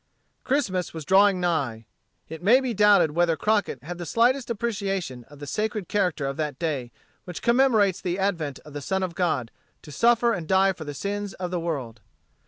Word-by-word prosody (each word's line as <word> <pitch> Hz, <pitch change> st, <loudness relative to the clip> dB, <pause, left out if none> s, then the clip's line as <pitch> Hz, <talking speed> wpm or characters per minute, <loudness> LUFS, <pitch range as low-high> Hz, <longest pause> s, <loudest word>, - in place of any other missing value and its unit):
Christmas 190 Hz, -, -1 dB
was 160 Hz, -2 st, -6 dB
drawing 195 Hz, 0 st, +5 dB
nigh. 140 Hz, -11 st, -1 dB, 0.4 s
It 160 Hz, +1 st, -8 dB
may 225 Hz, +8 st, +5 dB
be 260 Hz, -3 st, -2 dB
doubted 200 Hz, -6 st, +5 dB
whether 170 Hz, +1 st, +2 dB
Crockett 205 Hz, -, 0 dB
had 175 Hz, +3 st, -7 dB
the 175 Hz, -, -5 dB
slightest 245 Hz, -, +2 dB
appreciation 195 Hz, -, -3 dB
of 145 Hz, -, -16 dB
the 145 Hz, -, -8 dB
sacred 210 Hz, +3 st, -2 dB
character 180 Hz, -8 st, 0 dB
of 135 Hz, 0 st, -3 dB
that 150 Hz, -2 st, -3 dB
day 140 Hz, -8 st, -3 dB, 0.3 s
which 180 Hz, -2 st, -8 dB
commemorates 235 Hz, -6 st, +3 dB
the 180 Hz, -1 st, -2 dB
advent 170 Hz, -8 st, -1 dB
of 150 Hz, -, -12 dB
the 145 Hz, -, -5 dB
Son 190 Hz, +6 st, -1 dB
of 180 Hz, -2 st, -3 dB
God 150 Hz, -10 st, -1 dB, 0.3 s
to 150 Hz, -, -11 dB
suffer 235 Hz, +7 st, +3 dB
and 170 Hz, -5 st, -4 dB
die 190 Hz, +1 st, +3 dB
for 160 Hz, -3 st, -9 dB
the 145 Hz, -1 st, -6 dB
sins 200 Hz, +5 st, -4 dB
of 180 Hz, -1 st, -5 dB
the 180 Hz, -, -1 dB
world. 135 Hz, -10 st, -4 dB
180 Hz, 190 wpm, -25 LUFS, 150-205 Hz, 0.4 s, drawing